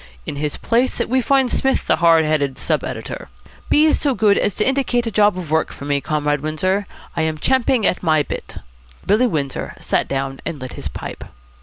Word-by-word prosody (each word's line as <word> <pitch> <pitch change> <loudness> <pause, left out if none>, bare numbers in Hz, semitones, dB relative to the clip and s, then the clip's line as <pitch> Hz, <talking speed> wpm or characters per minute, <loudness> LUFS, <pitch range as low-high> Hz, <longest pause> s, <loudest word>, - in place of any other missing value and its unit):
In - - -5
his 150 0 -2
place 240 +3 +1
we 260 +2 +1
find 265 0 +2
Psmith 270 0 +1
the - - +2
hard 165 -2 +5
headed 145 -3 0
sub - - -1
editor. - - -6 0.4
Be 305 +1 +5
so 280 -4 +1
good 210 -3 +4
as 205 - +1
to 210 - +1
indicate 260 -3 +1
a 230 - -2
job 205 -3 +3
of 170 -4 -6
work 160 0 +1
for 140 - -9
me, 145 -1 0
Comrade 150 -1 -1
Windsor. 185 +6 -1 0.3
I 165 - 0
am 160 -1 -1
champing 255 - +2
at 180 - +1
my 155 -3 +3
bit." - - -7 0.5
Billy 215 +6 +3
Windsor 145 - -3
sat - - 0
down, 135 0 -3
and 150 - -4
lit 130 -1 -7
his - - -6
pipe. - - -7
175 Hz, 200 wpm, -20 LUFS, 150-240 Hz, 0.5 s, hard